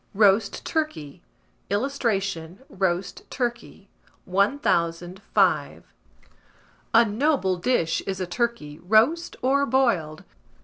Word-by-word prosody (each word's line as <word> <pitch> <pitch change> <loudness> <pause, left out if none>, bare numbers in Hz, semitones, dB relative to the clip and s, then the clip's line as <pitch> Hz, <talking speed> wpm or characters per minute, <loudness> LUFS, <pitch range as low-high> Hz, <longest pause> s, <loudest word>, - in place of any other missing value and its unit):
ROAST 200 0 +3
TURKEY. 305 - -3 0.5
[Illustration: 200 -6 -2
ROAST 185 -1 -2
TURKEY.] 235 -5 -4 0.4
1005. 185 -3 0 1.0
A 235 - +7
noble 220 - 0
dish 175 -5 0
is 190 -1 -3
a 185 - -2
turkey, 175 -7 -3
roast 230 - +2
or 275 +2 +3
boiled. 190 - 0
200 Hz, 85 wpm, -24 LUFS, 175-250 Hz, 1.0 s, A